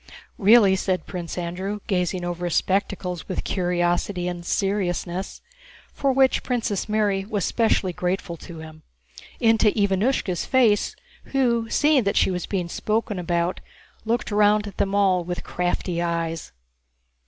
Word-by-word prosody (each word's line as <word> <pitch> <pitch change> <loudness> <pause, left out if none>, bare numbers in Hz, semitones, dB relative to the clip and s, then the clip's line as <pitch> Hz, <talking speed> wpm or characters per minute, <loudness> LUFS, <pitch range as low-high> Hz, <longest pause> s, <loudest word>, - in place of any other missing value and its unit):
"Really?" 205 -1 +6
said 185 -1 -1
Pierre, 180 +3 -4
gazing 180 -3 -1
over 175 0 -3
his 175 - -1
spectacles 185 -2 -1
with 185 - -3
curiosity 175 0 0
and 175 -1 -4
seriousness 190 -1 -2 0.5
(for 275 -1 +1
which 265 0 +3
Princess 225 -5 -2
Mary 205 -2 +1
was 200 -2 -2
specially 220 -5 +1
grateful 180 0 -2
to 170 +1 -10
him) 155 0 -11 0.6
into 225 -1 +4
Ivánushka's 200 -1 0
face, 235 -6 +3 0.3
who, 235 -4 +1
seeing 295 0 +3
that 200 - +1
she - - +3
was 180 -1 -3
being 185 -4 -2
spoken 210 +2 -2
about, 175 0 -1 0.4
looked 230 0 -1
round 210 0 +3
at 205 - -9
them 195 0 0
all 190 -3 +3
with 175 +1 -5
crafty 175 -1 -2
eyes. 165 -1 -2
190 Hz, 135 wpm, -24 LUFS, 175-210 Hz, 0.6 s, Really